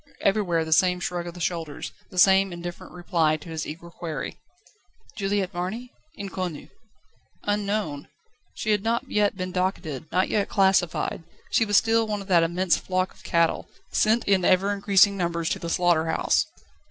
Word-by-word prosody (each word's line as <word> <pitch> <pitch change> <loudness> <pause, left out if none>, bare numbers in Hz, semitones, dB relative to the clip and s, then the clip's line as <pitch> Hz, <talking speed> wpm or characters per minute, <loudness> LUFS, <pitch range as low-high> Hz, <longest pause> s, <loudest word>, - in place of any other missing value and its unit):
Everywhere 185 -5 +1
the 160 - +2
same 180 +2 +3
shrug 175 -1 -3
of 170 - -8
the - - -9
shoulders, 165 -3 -3 0.2
the 185 - -12
same 190 +1 +5
indifferent 175 0 -7
reply 170 -3 +1
to 160 - -12
his 160 -1 -4
eager 170 +2 -8
query: 160 -5 -6 0.8
"Juliette 200 -2 -1
Marny? 205 +8 -4 0.3
Inconnue." 185 -5 -5 0.7
Unknown! 205 -8 -2 0.5
She 215 - -1
had 205 -2 +2
not 230 +2 -1
yet 205 -2 +2
been 185 -1 -4
docketed, 175 -6 -3
not 185 +2 +2
yet 205 -2 0
classified; 190 -5 +2 0.3
she 225 - +3
was 205 -1 +3
still 225 0 +3
one 210 -1 -2
of - - -16
that 175 -3 +5
immense 175 +2 +2
flock 185 0 -2
of - - -20
cattle, 170 -1 +1 0.2
sent 220 +2 +2
in 195 -2 +3
ever 190 +3 +3
increasing 200 0 +4
numbers 170 -2 -1
to - - -1
the 170 - -5
slaughter 170 -2 +2
house. 160 - +1
185 Hz, 165 wpm, -25 LUFS, 170-200 Hz, 0.8 s, same